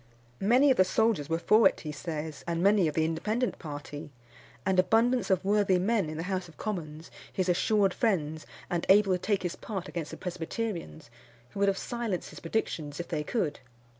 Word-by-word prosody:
Many 250 +7 +5
of 255 - +2
the - - +7
soldiers 190 -6 +1
were 165 - +1
for 215 +4 +5
it, - - -11
he 155 - -5
says, 155 0 -5
and 170 0 -1
many 200 -3 +5
of 150 - -3
the 160 - +2
Independent 215 +10 -1
party, 145 0 -7 0.6
and 190 -1 +2
abundance 235 +6 +3
of 190 -1 +2
worthy 200 -2 +3
men 195 -2 +1
in 155 - -5
the 165 - -3
House 185 -1 -2
of 165 - -17
Commons, 165 -6 -5 0.2
his 185 -1 -1
assured 195 +3 +2
friends, 160 -8 -1 0.2
and 175 -1 -1
able 195 0 +6
to 180 - 0
take 200 0 0
his 175 -1 -2
part 190 -4 -5
against 165 -4 -5
the - - -8
Presbyterians, 175 - -5 0.4
who - - -7
would 200 0 +4
have 195 - 0
silenced 235 -7 -3
his - - -10
predictions 165 -5 -3
if 175 - -5
they 155 -3 -1
could. 160 -4 -1
185 Hz, 195 wpm, -29 LUFS, 160-210 Hz, 0.6 s, the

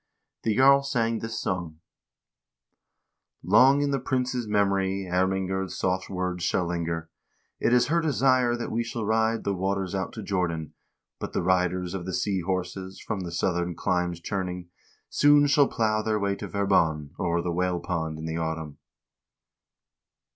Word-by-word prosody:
The 110 -2 0
jarl 140 +1 +6
sang 115 -5 0
this 115 0 -4
song: 85 -4 -3 1.7
Long 130 +9 +5
in 140 - 0
the 140 - +1
prince's 125 -2 -1
memory 100 -2 +1
Ermingerd's 95 +1 -1
soft 95 0 -1
words 90 -2 -3
shall 90 0 +1
linger; 85 -1 -3 0.5
It - - +1
is 125 0 +5
her 170 +5 +1
desire 130 -5 +2
that 120 - -4
we 115 +2 0
shall 115 -2 -4
Ride 110 +1 +1
the 100 - 0
waters 95 0 -2
out 95 -1 -2
to 110 - -7
Jordan; 85 -6 -2 0.5
But - - -6
the - - -1
riders 90 0 +1
of 95 -2 -5
the 95 - -3
sea 100 -3 0
horses, 95 +1 -4
From 105 - -4
the 90 -2 -5
southern 85 0 -1
climes 90 -1 -1
returning, 90 -1 -4 0.4
Soon 145 0 +5
shall 145 -1 +4
plow 110 -2 0
their 110 0 0
way 100 -1 0
to - - -6
Verbon 80 -7 +1
O'er 85 -2 0
the 90 - -1
whale 90 0 0
pond 80 -3 -3
in 80 - -6
the 80 0 -3
autumn. 80 -2 -4
95 Hz, 160 wpm, -26 LUFS, 90-115 Hz, 1.7 s, jarl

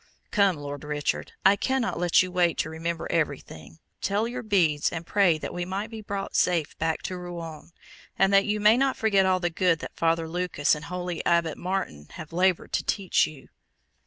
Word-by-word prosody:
"Come, 200 -4 +3
Lord 145 0 -7
Richard, 150 0 -2
I 195 +1 +7
cannot 260 -3 -1
let 175 +1 +4
you 185 - -6
wait 175 -2 +2
to 160 - -1
remember 165 +1 -3
everything; 80 - -3 0.2
tell 205 +3 0
your 250 +1 -5
beads 175 -10 +2
and 165 0 -5
pray 185 -3 +3
that - - -6
we 175 - -3
may 190 +3 -3
be 220 -1 -8
brought 200 -1 -5
safe 170 -4 +1
back 160 0 -1
to 185 - -4
Rouen; 170 -3 -8 0.5
and 195 +1 +3
that 195 0 +5
you 210 0 0
may 210 +3 +5
not 270 0 +1
forget 200 -4 +3
all 185 0 +2
the 175 -1 -1
good 175 -1 +2
that - - -9
Father 165 0 +1
Lucas 175 -3 0
and 150 +1 -4
holy 180 -1 -4
Abbot 170 -2 +2
Martin 180 - -4
have 155 +1 -9
laboured 180 0 +1
to - - +1
teach 195 -3 +1
you." 150 -3 -13
175 Hz, 195 wpm, -26 LUFS, 160-195 Hz, 0.5 s, I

